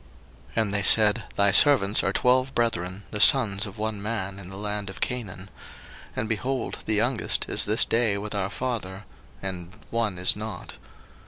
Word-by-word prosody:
01:042:013 - - +4
And 100 -2 -3
they 100 - +1
said, 105 +2 +4
Thy 100 0 +4
servants 105 -3 +4
are - - +1
twelve 130 +2 +1
brethren, 100 -4 -1
the 105 - -3
sons 105 -3 +5
of 100 +2 -11
one 110 -1 -3
man 100 -3 -4
in 90 -2 -9
the 95 - -8
land 105 -1 -4
of 95 - -9
Canaan; 100 -6 -4 0.7
and, 110 - -2
behold, 125 +3 -3
the 110 - 0
youngest 115 +3 0
is - - 0
this 105 +2 +2
day 115 -3 +1
with 105 +1 -5
our 100 -2 -2
father, 105 -7 -5 0.4
and 90 -3 -5 0.2
one 115 -5 -1
is 90 +1 +2
not. 110 +1 -7
105 Hz, 175 wpm, -25 LUFS, 100-115 Hz, 0.7 s, sons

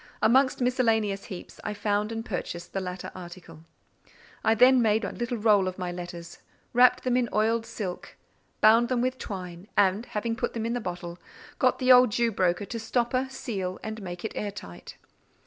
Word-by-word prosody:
Amongst 260 +3 +3
miscellaneous 225 -5 +1
heaps, 185 - -9
I 210 - -3
found 205 +1 -1
and 225 0 -4
purchased 175 -2 -5
the 195 - -1
latter 180 0 -6
article. 175 -2 -11 0.8
I 220 - +3
then 250 +2 +6
made 220 -1 +2
a - - -3
little 240 0 -3
roll 205 -3 +4
of 185 - -4
my 180 -2 -3
letters, 175 -1 -8 0.3
wrapped 245 +1 +5
them 250 -1 +1
in 245 -2 +1
oiled 225 +2 +1
silk, 205 -6 -6 0.4
bound 230 +3 +6
them 250 -2 +1
with 255 +1 -1
twine, 180 -2 -7
and, 205 +3 +3
having 230 +2 -2
put - - -2
them 225 -1 -3
in 230 - -1
the 245 - -2
bottle, 175 -2 -6 0.4
got - - +3
the 255 -1 +3
old 250 -1 +8
Jew 235 +2 +1
broker 185 0 0
to 230 +3 -5
stopper, 245 +3 0
seal, 195 -8 -4
and 220 0 -5
make 180 0 -7
it - - -3
air 210 - -3
tight. 90 - -10
215 Hz, 185 wpm, -27 LUFS, 185-235 Hz, 0.8 s, old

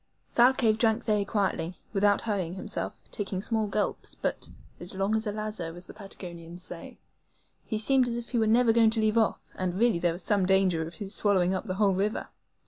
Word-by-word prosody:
Thalcave 240 -3 +4
drank 225 0 +2
very 210 -2 +2
quietly, 185 -4 -1 0.2
without 205 0 +3
hurrying 190 -6 -2
himself, 205 +2 -5
taking 195 -2 -3
small 220 +1 0
gulps, 205 0 -2
but - - -3 0.3
"as 175 +2 -6
long 195 +3 +1
as 220 0 -1
a - - 0
lazo," 210 -6 -4
as 175 +1 -7
the - - -11
Patagonians 175 -3 -8
say. 175 -2 -7 0.7
He 220 - -3
seemed 255 +3 +4
as 235 0 -1
if 240 0 -6
he 240 - 0
were 220 - +2
never 230 +1 +4
going 225 -1 +5
to 225 +1 0
leave 215 +1 +3
off, 220 - +1
and 185 -1 -2
really 225 -3 +2
there 170 -1 +1
was 175 +2 -4
some 200 -3 +2
danger 190 -3 +3
of 170 - -10
his 205 -1 -4
swallowing 190 -4 +3
up 190 - -2
the 185 - -2
whole 200 -1 +3
river. 200 +4 -1
205 Hz, 210 wpm, -28 LUFS, 185-220 Hz, 0.7 s, going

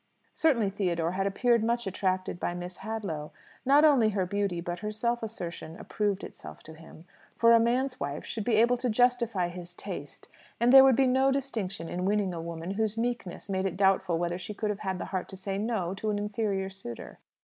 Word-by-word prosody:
Certainly 235 -11 +2
Theodore 170 -4 -1
had 195 +2 0
appeared 235 +3 +2
much 235 +1 0
attracted 185 -1 -1
by 175 - -2
Miss 180 0 -7
Hadlow. 195 -8 -4 0.4
Not 290 +3 +6
only 260 -8 +5
her 195 -3 0
beauty 200 -1 -1
but 175 0 -4
her 210 +3 -3
self 235 +2 -1
assertion 175 -6 -6
approved 205 -2 -2
itself 75 -1 -10
to 160 - -11
him; 160 +1 -14 0.3
for 230 0 +5
a 230 - +7
man's 250 +3 +1
wife 140 +1 -4
should 220 - -4
be 230 +1 +2
able 240 +3 +4
to 250 +1 -1
justify 235 -5 +2
his 175 0 -9
taste; 145 -9 -8 0.3
and 240 +2 +4
there 270 0 +11
would 265 -2 +6
be 270 +2 +4
no 265 +1 +3
distinction 220 -11 -3
in 180 +2 -3
winning 200 -2 +1
a 165 - -4
woman 165 +1 -5
whose 220 +1 -1
meekness 235 -6 -3
made 190 -1 0
it 185 - -5
doubtful 190 -3 +3
whether 175 +1 -2
she 195 +3 -7
could 210 0 -1
have 205 - -5
had 190 -3 -2
the - - -4
heart 185 - -2
to 190 - -8
say 195 +1 -3
"No" 205 -5 -1
to 205 +3 -3
an 210 - 0
inferior 205 -2 -2
suitor. 155 -12 -9
200 Hz, 210 wpm, -29 LUFS, 180-230 Hz, 0.4 s, there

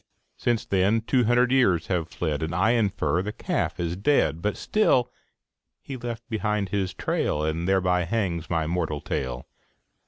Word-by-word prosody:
Since 120 -3 0
then 100 +4 +2
two 125 +1 +2
hundred 120 +2 +3
years 100 -11 +3
have 90 -4 -1
fled, 75 -4 -2
And, 80 +1 -2
I 95 +6 +3
infer, 95 -8 +1
the 105 +2 -4
calf - - -2
is 85 0 -1
dead. 90 - +2
But 105 +3 -1
still 130 - +2 0.7
he 135 - -7
left 120 -2 -6
behind 105 -3 -1
his 95 -3 -1
trail, 75 -4 -1
And 80 +3 -2
thereby 90 -2 +2
hangs 85 -5 -2
my 80 -2 0
moral 80 -3 -2
tale. 65 -1 -3
95 Hz, 160 wpm, -25 LUFS, 85-115 Hz, 0.7 s, hundred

